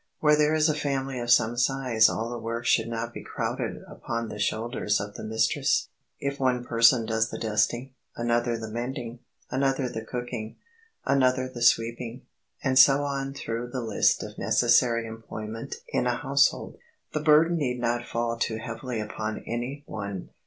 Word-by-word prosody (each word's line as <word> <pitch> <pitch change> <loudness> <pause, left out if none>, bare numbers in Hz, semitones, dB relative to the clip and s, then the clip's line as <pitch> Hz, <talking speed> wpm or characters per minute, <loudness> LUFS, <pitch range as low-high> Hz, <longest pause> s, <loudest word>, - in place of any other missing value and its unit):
Where 150 -1 +5
there 150 +1 +3
is 155 0 +4
a 155 - +2
family 135 -3 -2
of 120 0 -4
some 120 -1 +4
size 125 -3 +3
all 115 - -2
the 120 - -4
work 115 +1 -4
should 115 -1 +3
not 115 0 -4
be - - -7
crowded - - -3
upon 115 -1 -4
the 105 - -7
shoulders 110 0 0
of 100 +1 -5
the - - -8
mistress. 110 +1 +1 0.3
If 140 0 -3
one 125 -2 +1
person 115 0 +4
does 110 0 0
the - - -5
dusting, 120 +4 0 0.2
another 120 0 0
the 110 0 -6
mending, 120 0 -4 0.3
another 135 0 +1
the 110 -2 -5
cooking, 120 -2 -5 0.5
another 130 -1 +2
the 125 -2 -9
sweeping, 115 +2 +1 0.4
and 130 -1 +3
so 140 +1 +7
on 135 -1 -3
through 115 -2 -4
the 125 +1 -4
list 110 -3 +2
of - - -9
necessary 120 -1 +3
employment 110 0 -7
in 125 - 0
a 120 - +1
household, 140 +1 +1 0.3
the 155 - 0
burden 155 +3 +4
need 125 -5 -1
not 120 0 0
fall 115 0 -1
too 110 -1 -1
heavily 115 +1 -5
upon 110 0 -4
any 125 +5 -4
one. 100 -3 -6
120 Hz, 170 wpm, -27 LUFS, 115-135 Hz, 0.5 s, so